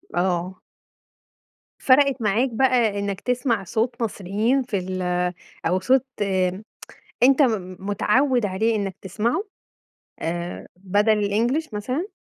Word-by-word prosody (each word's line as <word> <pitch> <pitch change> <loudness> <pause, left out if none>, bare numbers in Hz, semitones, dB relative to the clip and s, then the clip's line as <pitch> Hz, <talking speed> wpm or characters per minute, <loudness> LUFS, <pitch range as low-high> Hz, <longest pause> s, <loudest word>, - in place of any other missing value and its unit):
آه. 180 +1 -1 1.2
فرقت 270 -1 +4
معاك 220 +5 +2
بقى 235 -4 +2
إنك 200 -1 -3
تسمع 245 -4 0
صوت 235 +6 -2
مصريين 220 +5 0
في 215 -5 -2
ال 185 0 -4 0.6
أو 185 +3 +2
صوت 260 +4 +3 1.2
أنت 270 +3 +6
م 190 -7 0
متعوِد 215 +5 +1
عليه 220 +4 0
إنك 195 -2 -3
تسمعه؟ 225 - -1 0.8
آآ 170 +2 -4
بدل 205 +2 +1
الEnglish 240 +6 0
مثلًا؟ 255 - -2
215 Hz, 110 wpm, -23 LUFS, 190-250 Hz, 1.2 s, أنت